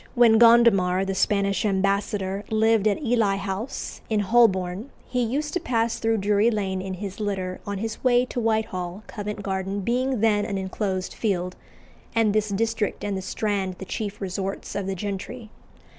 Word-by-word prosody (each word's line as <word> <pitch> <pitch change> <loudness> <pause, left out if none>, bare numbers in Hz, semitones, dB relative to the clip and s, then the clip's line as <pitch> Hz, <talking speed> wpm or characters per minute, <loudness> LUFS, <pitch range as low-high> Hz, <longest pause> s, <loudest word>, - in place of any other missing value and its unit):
when 230 -2 +6
Gondomar, 210 -6 +5
the 195 - -2
Spanish 200 +1 +1
ambassador, 200 0 0
lived 220 -1 +3
at 210 +8 0
Ely 225 -5 +2
House, 200 +5 -5
in 215 -2 +2
Holborn, 200 -1 +2 0.2
he 250 -1 -1
used 285 +6 -1
to 360 - +1
pass 230 -7 0
through 225 0 +1
Drury 205 +2 +3
Lane 195 -4 -1
in 190 0 -4
his 195 +1 -6
litter 190 -3 -3
on 200 0 -2
his 220 +2 -5
way 250 -1 +4
to 255 - -4
Whitehall, 215 -4 -1
Covent 210 -1 -6
Garden 195 +1 -2
being 250 +4 0
then 210 -2 +3
an 205 -2 -2
enclosed 190 -1 -3
field, 180 -4 -1 0.6
and 225 -2 +3
this 215 0 +1
district 225 +1 -1
and 205 -1 -1
the 190 - -3
Strand 195 -1 -2
the 190 - -7
chief 205 +1 -4
resorts 195 +1 -4
of 200 -2 -3
the 195 - -2
gentry. 210 +4 -5
205 Hz, 170 wpm, -25 LUFS, 195-225 Hz, 0.6 s, when